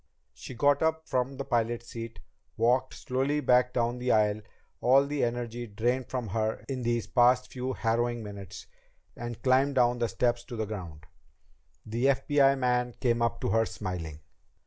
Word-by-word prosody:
She 130 - -10
got 140 +4 +3
up 160 0 0
from 130 +1 -1
the 140 - -4
pilot's 120 0 -1
seat, 115 -1 -7 0.4
walked 125 +3 +2
slowly 135 +2 -1
back 125 -3 +3
down 120 0 -1
the 125 0 0
aisle, 105 0 +2 0.4
all 135 +3 +5
the 145 0 -1
energy 120 0 -3
drained 120 +5 -1
from 125 -4 -3
her 110 +2 -2
in 130 -2 -3
these 120 -1 0
past 125 0 +3
few 130 0 -3
harrowing 120 0 0
minutes, 100 -2 -9 0.5
and 120 -1 -6
climbed 135 +2 +3
down 120 -1 +3
the 120 - +1
step 120 +4 +1
to 120 - -6
the 110 -1 -2
ground. 85 -8 -7 0.8
The 115 +4 -2
FBI 140 0 +3
man 125 -2 0
came 120 -2 +1
up 115 0 0
to - - -1
her, 115 0 +2
smiling. 80 -4 -6
120 Hz, 170 wpm, -29 LUFS, 115-130 Hz, 0.8 s, all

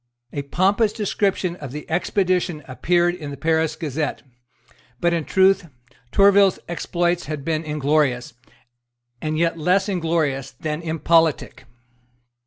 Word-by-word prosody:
A 145 - -2
pompous 195 +9 +1
description 195 -4 -1
of 140 -6 -8
the 150 +2 -7
expedition 180 -2 0
appeared 175 +6 +1
in 155 -5 -7
the 140 - -7
Paris 160 -1 +1
Gazette. 155 -1 -3 0.8
But 175 0 +2
in 165 -3 -1
truth 190 -1 +3 0.4
Tourville's 200 -1 +5
exploits 175 0 -1
had 150 -2 -5
been 160 -1 -1
inglorious, 150 -5 0 0.9
and 155 0 -2
yet 165 0 0
less 185 +5 +2
inglorious 160 -7 -1
than 155 0 -3
impolitic. 160 -3 +1
165 Hz, 120 wpm, -22 LUFS, 150-180 Hz, 0.9 s, Tourville's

